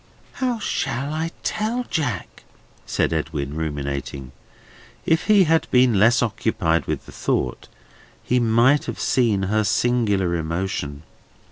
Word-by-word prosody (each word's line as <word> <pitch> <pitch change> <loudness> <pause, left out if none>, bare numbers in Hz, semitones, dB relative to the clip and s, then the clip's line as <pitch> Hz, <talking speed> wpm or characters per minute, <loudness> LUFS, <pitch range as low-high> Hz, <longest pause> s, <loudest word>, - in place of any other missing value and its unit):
"How 250 -2 +1
shall 140 - -2
I 160 +1 -2
tell 225 +4 -1
Jack?" 125 - -3 0.5
said - - 0
Edwin, 75 -3 -3
ruminating. 70 -4 -4 0.7
If 160 0 +2
he 205 -2 +6
had 165 -1 +2
been 125 -5 +4
less 115 +4 +4
occupied 85 -7 0
with - - -3
the - - -12
thought, - - -2 0.6
he 125 - +1
must 120 +5 +3
have - - -5
seen 110 -6 +2
her 110 +3 +1
singular 105 -5 +1
emotion. 80 -3 -3
110 Hz, 125 wpm, -22 LUFS, -, 0.7 s, he